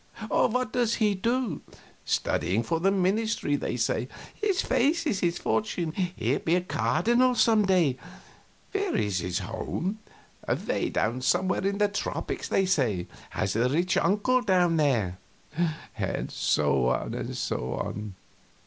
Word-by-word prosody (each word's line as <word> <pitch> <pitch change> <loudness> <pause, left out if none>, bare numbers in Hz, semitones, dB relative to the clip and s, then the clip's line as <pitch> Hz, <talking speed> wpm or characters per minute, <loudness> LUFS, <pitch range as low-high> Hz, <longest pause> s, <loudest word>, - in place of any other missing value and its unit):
"What 250 +1 +1
does 235 -2 +2
he 210 -2 +2
do?" 230 - -1 0.4
"Studying 100 +6 0
for 165 +8 -1
the 190 +4 +3
ministry, 195 -3 +1
they - - -2
say." - - 0 0.3
"His 405 -4 0
face 320 +6 +2
is 220 -11 0
his 170 -1 0
fortune 180 -6 -1
he'll 180 +1 -1
be 165 - +1
a 180 - +2
cardinal 240 +7 +2
some 220 -2 +4
day." 170 -9 +3 0.7
"Where 400 -2 -1
is 100 -3 0
his 90 0 -2
home?" 175 - -3 0.5
"Away - - -1
down 120 +4 -1
somewhere 185 +8 +1
in 200 0 -1
the 205 0 +3
tropics, 205 0 -3
they 195 - +2
say 120 - +1 0.2
has 95 - -2
a 120 +3 +2
rich 175 +7 +1
uncle 210 +6 +2
down 180 -6 +3
there." 115 - +1 0.8
And - - -3
so 65 -2 +2
on. 90 - -3
185 Hz, 135 wpm, -27 LUFS, -, 0.8 s, some